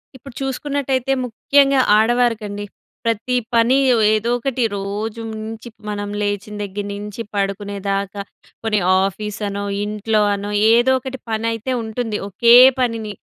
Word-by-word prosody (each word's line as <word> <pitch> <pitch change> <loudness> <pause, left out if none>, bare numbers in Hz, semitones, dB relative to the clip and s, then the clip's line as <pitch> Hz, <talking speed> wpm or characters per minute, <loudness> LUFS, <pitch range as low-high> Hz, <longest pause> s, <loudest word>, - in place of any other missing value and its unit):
ఇప్పుడు 260 +1 -12
చూసుకున్నట్టయితే 270 -1 -1
ముఖ్యంగా 275 +3 +3 0.2
ఆడవారికండి. 220 -3 +1 0.4
ప్రతి 230 +2 0 0.2
పని 235 +2 +4 0.4
ఏదోకటి 240 +4 0
రోజు 210 +3 -4
నుంచి 220 +1 -7 0.2
మనం 205 -1 -4
లేచిన 205 0 -3
దగ్గర 200 0 -5
నుంచి 205 +2 -6
పడుకునేదాకా 200 0 -2 0.4
కొని 215 -2 +1 0.2
ఆఫీస్‌ 205 +2 -4
అనో, 200 0 -4 0.2
ఇంట్లో‌ 215 +1 0
అనో, 200 +1 -5 0.2
ఏదో 240 +3 +4
ఒకటి 265 0 -7
పని 220 0 -2
అయితే 225 +3 -4
ఉంటుంది. 220 -1 -3
ఒకే 235 +5 +5 0.2
పనిని 230 -4 -1
220 Hz, 120 wpm, -19 LUFS, 205-240 Hz, 0.4 s, ఒకే